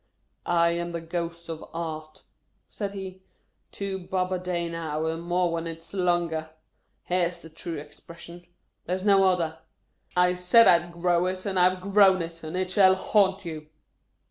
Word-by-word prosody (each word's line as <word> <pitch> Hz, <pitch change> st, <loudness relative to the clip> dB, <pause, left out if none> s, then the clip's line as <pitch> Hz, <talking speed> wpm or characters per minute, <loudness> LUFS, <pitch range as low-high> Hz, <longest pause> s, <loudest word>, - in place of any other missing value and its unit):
" -, -, -48 dB
I 170 Hz, -1 st, +3 dB
am 170 Hz, 0 st, -3 dB
the 170 Hz, -, -2 dB
Ghost 170 Hz, 0 st, -5 dB
of 160 Hz, -1 st, -6 dB
Art," 155 Hz, -2 st, -6 dB, 0.5 s
said 200 Hz, -2 st, -4 dB
he. 190 Hz, -1 st, -7 dB, 0.3 s
" -, -, -47 dB
Two 195 Hz, -1 st, -4 dB
bob 185 Hz, 0 st, -2 dB
a 185 Hz, -, -1 dB
day 175 Hz, -1 st, -2 dB
now, 160 Hz, -2 st, -3 dB
and 160 Hz, +1 st, -2 dB
more 175 Hz, 0 st, 0 dB
when 165 Hz, 0 st, -3 dB
its 165 Hz, +2 st, -8 dB
longer! 175 Hz, -4 st, 0 dB, 0.5 s
Hair 180 Hz, -1 st, +1 dB
's 175 Hz, -, -9 dB
the 160 Hz, -, -12 dB
true 165 Hz, +1 st, -6 dB
expression. 170 Hz, +4 st, -11 dB, 0.4 s
There 180 Hz, -, 0 dB
is 190 Hz, +1 st, -6 dB
no 195 Hz, -1 st, +5 dB
other. 170 Hz, -4 st, 0 dB, 0.6 s
I 180 Hz, 0 st, +4 dB
SAID 180 Hz, +6 st, +5 dB
I 170 Hz, -, +7 dB
'D 175 Hz, -, -14 dB
GROW 175 Hz, +1 st, +1 dB
IT, 185 Hz, 0 st, -3 dB
AND 190 Hz, -2 st, 0 dB
I 180 Hz, 0 st, +6 dB
'VE 185 Hz, +2 st, -6 dB
GROWN 190 Hz, -3 st, +6 dB
IT, 165 Hz, 0 st, -9 dB
AND 155 Hz, +3 st, -5 dB
IT 185 Hz, 0 st, -1 dB
SHALL 190 Hz, -1 st, +5 dB
HAUNT 195 Hz, 0 st, +2 dB
YOU 155 Hz, -2 st, -7 dB
175 Hz, 190 wpm, -26 LUFS, 165-185 Hz, 0.6 s, I